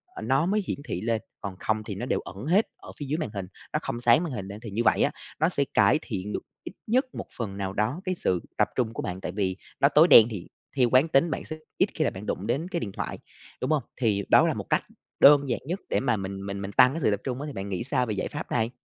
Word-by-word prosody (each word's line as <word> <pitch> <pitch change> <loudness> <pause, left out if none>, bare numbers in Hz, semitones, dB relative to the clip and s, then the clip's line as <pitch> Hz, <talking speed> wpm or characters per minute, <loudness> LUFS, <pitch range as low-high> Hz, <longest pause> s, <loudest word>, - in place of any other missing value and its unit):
ơ, - - -6
nó 135 +4 +2
mới 205 +3 +1
hiển - - -2
thị 90 - -3
lên, 115 0 0 0.2
còn 100 -2 -5
không 110 0 -1
thì 105 -2 -6
nó 120 +6 -4
đều - - 0
ẩn 95 +6 -9
hết 190 +8 +3
ở - - -11
phía 145 - -5
dưới 150 +4 -1
màn 155 -9 -3
hình, 95 -3 -4 0.3
nó - - +1
không 120 - -4
sáng 120 +7 +5
màn 165 - -4
hình 100 -5 -5
lên. 100 +2 -8
Thì 115 - -7
như 115 +4 0
vậy - - +4
á, - - +2 0.3
nó 160 +3 +3
sẽ 140 - +1
cải 155 - +4
thiện 105 - -5
được - - -2 0.2
ít - - -8
nhất 255 +5 +3
một - - -5
phần 100 -5 -4
nào 95 -1 -3
đó 110 - -1
cái 185 - -1
sự 90 - 0 0.2
tập - - +3
trung 115 -3 0
của - - -4
bạn. 95 -4 -4
Tại 90 - -4
vì 95 -2 -1 0.2
nó 140 - +5
tối 150 +3 +6
đen 115 -9 +9
thì 95 -5 -6 0.3
theo 125 -2 +4
quán 130 +5 +5
tính 155 +1 +3
bạn - - -3
sẽ 155 - -5 0.2
ít 195 - +3
khi 155 - 0
là - - +2
bạn 95 +3 -9
đụng 100 +1 -3
đến 150 +9 -1
cái 175 -2 -2
điện 100 - -4
thoại, - - -5 0.4
đúng 130 - -1
hông? 150 -4 +2
Thì 105 -5 +1
đó - - +6
là - - +1
một - - -4
cách - - +2 0.4
đơn 140 -1 +7
giản 120 - 0
nhất 180 +6 -3
để - - +2
mà 130 - +1
mình 95 0 -5
mình 100 0 -4
mình 100 - -5
tăng 125 +6 +6
cái 165 - -4
sự 110 - +3
tập 100 - 0
trung 130 +1 -3
á, 150 - -4
thì 145 - -6
bạn 95 +1 -5
nghĩ 95 +2 -2
sao 125 0 0
về 110 - -2
giải 100 - -2
pháp 150 - -7
này? 115 -1 +1
120 Hz, 300 wpm, -26 LUFS, 100-150 Hz, 0.4 s, đen